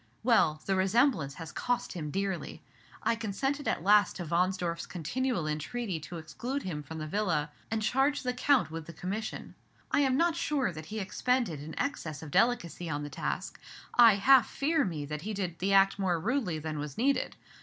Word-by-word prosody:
Well, 215 -10 +3
the 195 - +1
resemblance 190 - +2
has 165 -4 -8
cost 245 - -1
him 155 -4 -4
dearly. 195 +2 -3 0.4
I - - +2
consented 270 +7 -2
at - - 0
last 205 +1 +5
to 175 - -5
Wahnsdorf's 175 0 0
continual 205 - -2
entreaty 160 +6 -3
to 170 +3 -8
exclude 245 - -4
him 155 -5 -4
from 160 +3 -8
the 155 - -4
Villa, 155 -4 0 0.2
and 220 -1 -1
charged 270 +6 +2
the 250 -1 0
Count 250 - +2
with 160 -1 -6
the 170 - -8
commission. 195 +7 -5 0.4
I - - +3
am 265 -2 +3
not 335 0 +3
sure 275 -9 0
that 155 -2 -9
he 215 +4 -4
expended 210 - 0
an 150 +2 -8
excess 160 - -3
of 150 - -8
delicacy 180 - +1
on 145 -1 -2
the 145 - -6
task; - - -4 0.3
I 230 -4 +8
half 250 +3 +5
fear 305 +1 +1
me 155 -6 -3
that 150 +1 -5
he 210 +4 -4
did 180 -4 -3
the 195 +2 0
act 195 0 +5
more 180 -3 +1
rudely 220 - 0
than 155 -1 -4
was 145 -2 -6
needed. 275 +3 +1
190 Hz, 190 wpm, -30 LUFS, 160-245 Hz, 0.4 s, I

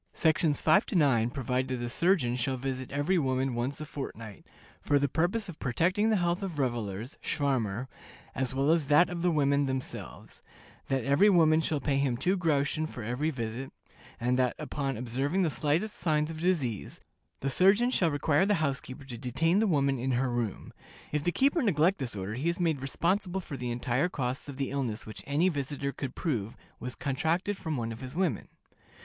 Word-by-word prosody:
Sections 160 -2 +2
5 195 - +4
to - - -4
9 130 -8 +3
provide 130 0 -1
that 130 -1 -3
a 120 - -3
surgeon 135 -2 +2
shall 130 +1 -1
visit 130 0 -4
every 145 +6 +1
woman 130 -2 0
once 125 +4 -2
a 155 - -5
fortnight, 115 -8 -8 0.3
"for 145 - +2
the 140 0 +2
purpose 175 - 0
of 175 -4 -9
protecting 185 - +1
the 220 - +3
health 175 -1 0
of 185 -6 -4
revelers 120 -3 -3
(schwarmer), 125 -5 -1 0.5
as 130 -2 -1
well 135 +3 +3
as 165 -4 +2
that 150 +5 +5
of 175 -1 -4
the 180 - +3
women 140 -3 +2
themselves;" 130 -1 -5 0.5
that 135 -2 0
every 140 - +5
woman 160 -4 +5
shall 155 -2 0
pay 140 0 0
him 135 -3 +1
two 185 +9 +1
groschen 155 -3 +1
for 115 -7 -7 0.2
each 155 -2 0
visit; 115 +2 -4 0.5
and 125 +2 +1
that, 125 -1 +2
upon 140 -4 -3
observing 135 - 0
the 165 - +1
slightest 155 - 0
signs 155 -1 +1
of 160 0 -7
disease, 145 - -1 0.4
the 135 - 0
surgeon 200 - +4
shall 175 -9 +2
require 145 +3 +2
the 205 - +3
housekeeper 140 -4 -3
to 120 -4 -7
detain 165 - +1
the 220 - +3
woman 140 -6 +2
in 130 +2 0
her 125 +1 +1
room. 120 -5 -3 0.4
If 150 -1 -1
the 175 - +1
keeper 280 - +2
neglect 185 - +2
this 125 -5 -3
order, 100 +1 -4
he 135 +8 -1
is 170 - -2
made 160 -6 +1
responsible 180 +7 0
for 160 -6 -7
the 125 -2 -4
entire 125 +6 0
costs 130 -2 -3
of 135 - -7
the 135 -1 -2
illness 125 -6 -2
which 110 - -9
any 150 +6 +2
visitor 140 -3 -2
could 135 -2 -6
prove 115 - -2 0.2
was 125 +1 -6
contracted 160 +8 -1
from 160 -5 -3
one 115 -1 -2
of 115 - -8
his 130 +2 -7
women. 170 - 0
140 Hz, 195 wpm, -29 LUFS, 125-170 Hz, 0.5 s, that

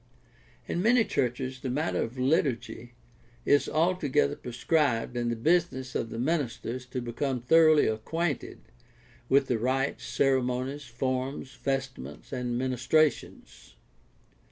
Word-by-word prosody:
— - - -31
In 175 - -1
many 230 +3 +4
churches 130 +1 -2
the 130 - -4
matter 150 +6 -1
of 115 +3 -4
liturgy 125 -4 -1 0.5
is 145 - +3
altogether 155 - +1
prescribed 125 -1 0
and 120 -1 -1
the 120 - -1
business 130 -1 +1
of 115 - -2
the 115 - -6
minister 135 -3 -1
is 125 +1 -5
to 125 0 -4
become 125 +2 -2
thoroughly 155 +4 +5
acquainted 145 +9 -2 0.7
with 135 0 +4
the 125 -3 -1
rites, 130 +3 -1
ceremonies, 130 +1 0
forms, 130 +2 -3
vestments, 135 - -4
and 125 -1 -2
ministrations. 130 +4 -1
130 Hz, 125 wpm, -28 LUFS, 120-145 Hz, 0.7 s, thoroughly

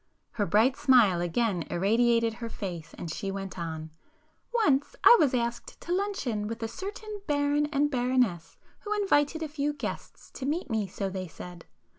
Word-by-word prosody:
Her 210 -4 -1
bright 230 +6 +4
smile 225 -12 +4
again 180 +1 0
irradiated 230 +5 +2
her 230 - -4
face 175 -7 -6
and 165 - -5
she 195 +5 -4
went 195 -1 -5
on—"Once 285 - -3
I - - +10
was 275 -4 +3
asked 235 -1 -3
to 345 - -3
luncheon 320 - -1
with 230 +1 -5
a - - -1
certain 410 - -7
baron 290 0 +2
and 290 0 +1
baroness 245 - 0 0.2
who 420 -2 -3
invited 320 -5 +2
a - - -2
few 295 0 -2
guests 290 - -7
"to 265 - -5
meet 300 -2 -2
me," 215 -3 0
so 195 +1 -4
they 185 -1 -4
said. 175 +2 -10
240 Hz, 165 wpm, -28 LUFS, 195-295 Hz, 0.2 s, I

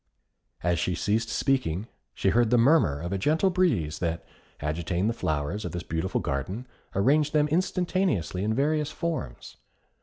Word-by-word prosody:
As 85 -1 +1
she 90 +1 0
ceased 110 +3 0
speaking, 110 -9 0 0.3
she 95 - +1
heard 120 +2 +3
the 120 - +4
murmur 115 - +4
of 85 +4 -4
a 95 - -1
gentle 160 - +2
breeze 115 - +1
that, 85 -1 -2 0.3
agitating 85 +5 -1
the 115 - +1
flowers 80 -1 -2
of - - -5
this 90 0 -4
beautiful 85 +4 -2
garden, 90 - -3 0.3
arranged 145 +9 +3
them 150 -1 +3
instantaneously 175 - 0
in 110 +1 0
various 150 +2 +1
forms. 160 - -5
105 Hz, 155 wpm, -27 LUFS, -, 0.3 s, the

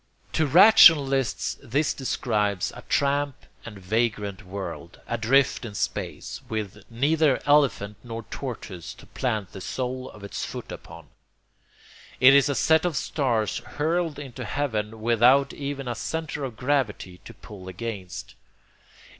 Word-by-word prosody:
To 160 - +2
rationalists 140 - +6
this 140 +6 0
describes 105 -7 -1
a - - -9
tramp 140 -1 0 0.2
and 110 -3 -9
vagrant 105 0 -1
world, 90 -3 -7
adrift 120 +4 +2
in 110 -4 -7
space, - - -4
with 110 -3 -4
neither 145 +4 +2
elephant 130 -8 +2
nor 115 -1 -6
tortoise 105 -10 -6
to - - -15
plant 110 -7 -3
the 95 - -9
sole 130 +4 -4
of 105 - -14
its 100 - -5
foot - - -7
upon. - - -11 1.1
It 130 +1 +8
is 140 +1 +5
a 140 - 0
set 160 +3 +3
of 175 -5 -1
stars 120 -9 0
hurled 165 +1 -2
into 130 -4 -7
heaven 110 -4 -3
without 120 +5 +4
even 140 -2 -5
a 120 - -1
centre 155 +4 -4
of 120 -4 -7
gravity 125 -9 -1
to - - -10
pull 95 -3 -12
against. 95 -1 -6
120 Hz, 135 wpm, -25 LUFS, 105-140 Hz, 1.1 s, It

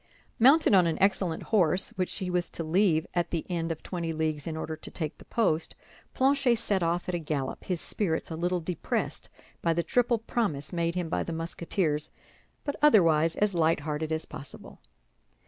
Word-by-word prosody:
Mounted 275 +3 +6
on 185 -3 +6
an 165 - 0
excellent 190 -4 +1
horse, 180 -2 +3
which 185 -1 -2
he 185 -2 -3
was 180 -1 0
to 165 - -5
leave 165 -1 +2
at 175 -1 0
the 165 -3 -2
end 165 -1 -1
of 160 - -5
twenty 170 -3 -3
leagues 155 -2 -2
in 160 -1 -3
order 160 0 -4
to 155 - -5
take 155 -3 -5
the - - -14
post, 170 -8 0 0.4
Planchet 265 -2 +3
set 205 -4 0
off 170 +1 0
at 180 - -2
a 175 - 0
gallop, 150 -4 -3
his 180 -3 -1
spirits 165 -2 -2
a - - -3
little 175 +2 -1
depressed 170 0 -2 0.3
by 165 - +2
the 170 +1 0
triple 245 +2 +2
promise 205 - -2
made 170 0 0
him 180 -2 -1
by - - -1
the 170 - -4
Musketeers, 165 -1 -1 0.5
but 285 - -2
otherwise 165 - +5
as 210 -1 +1
light 165 -2 +2
hearted 155 +1 -3
as 160 0 -1
possible. 140 - -10
170 Hz, 190 wpm, -28 LUFS, 160-190 Hz, 0.5 s, Mounted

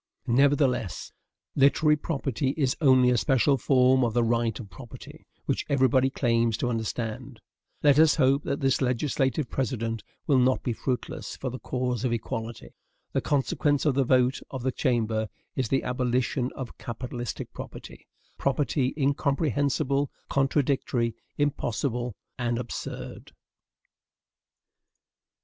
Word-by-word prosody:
Nevertheless, 130 - +1 0.4
literary 150 +2 +4
property 140 -3 -2
is 135 -4 +1
only 130 -3 +5
a 125 - +3
special 135 +2 +3
form 130 0 +4
of 115 -1 0
the 120 - +3
right 115 -2 0
of 100 -5 -9
property, 120 +5 -12 0.2
which - - 0
everybody 130 -1 +3
claims 115 -4 +1
to 125 0 -1
understand. 115 0 -4 0.4
Let 145 -1 +5
us 160 -1 +6
hope 135 +2 +3
that 140 - -3
this 135 0 +2
legislative 130 +1 0
precedent 115 -4 -2 0.2
will 140 -3 +4
not 130 +1 +2
be 120 - -1
fruitless 125 +2 -4
for 130 - -4
the 130 - -6
cause 125 -2 -2
of 125 - +1
equality. 115 0 -4 0.4
The - - +1
consequence 145 +1 +1
of 150 - +3
the 135 +1 +2
vote 130 +1 +3
of 130 -3 -6
the 130 - +1
Chamber 110 -5 0 0.3
is 130 -3 0
the 135 - +1
abolition 125 0 0
of 130 -3 -7
capitalistic 120 +1 -5
property, - - -10 0.3
property 140 -1 0
incomprehensible, 140 0 +1 0.2
contradictory, 135 -4 +1 0.2
impossible, 125 -4 -1 0.2
and 120 -1 0
absurd. 120 -1 -6
130 Hz, 125 wpm, -27 LUFS, 120-140 Hz, 0.4 s, us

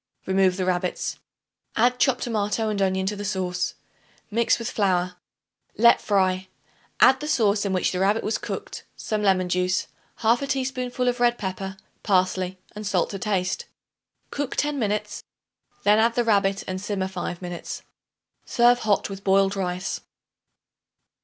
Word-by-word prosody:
Remove 190 -1 +2
the 185 - -1
rabbits. 180 -1 -1 0.6
Add 245 +2 +3
chopped 260 -3 +2
tomato 215 -1 0
and 205 -2 -1
onion 190 0 +1
to 205 +2 -1
the 205 - -6
sauce; 185 -3 -2 0.6
mix 230 +2 +3
with 230 - -4
flour; 180 -3 +1 0.6
let 235 +2 +6
fry; 190 -2 +1 0.5
add 265 - +6
the 300 - -5
sauce 210 -7 +2
in 200 - 0
which 185 -1 +1
the 180 - -2
rabbit 205 +4 +2
was 215 - -1
cooked, - - -6
some 215 -1 -2
lemon 190 -3 +3
juice, 180 +1 0 0.3
1/2 235 +5 +2
teaspoonful 255 -2 -1
of 245 0 +1
red 240 0 +3
pepper, 190 0 -5 0.2
parsley 185 -2 +1 0.2
and 210 0 -5
salt 190 -4 +1
to 195 - -5
taste. 190 -2 -1 0.7
Cook 285 -2 -3
ten 290 -1 0
minutes; 210 -2 -2 0.6
then 210 +1 +5
add 230 +1 +3
the 240 - +2
rabbit 200 -3 +2
and 185 0 -3
simmer 195 -2 -2
five 180 -2 -5
minutes. 175 -2 -6 0.6
Serve 240 0 +4
hot 210 -4 +1
with 195 -1 -8
boiled 195 0 +3
rice. 185 -1 -3
200 Hz, 155 wpm, -24 LUFS, 185-230 Hz, 0.7 s, let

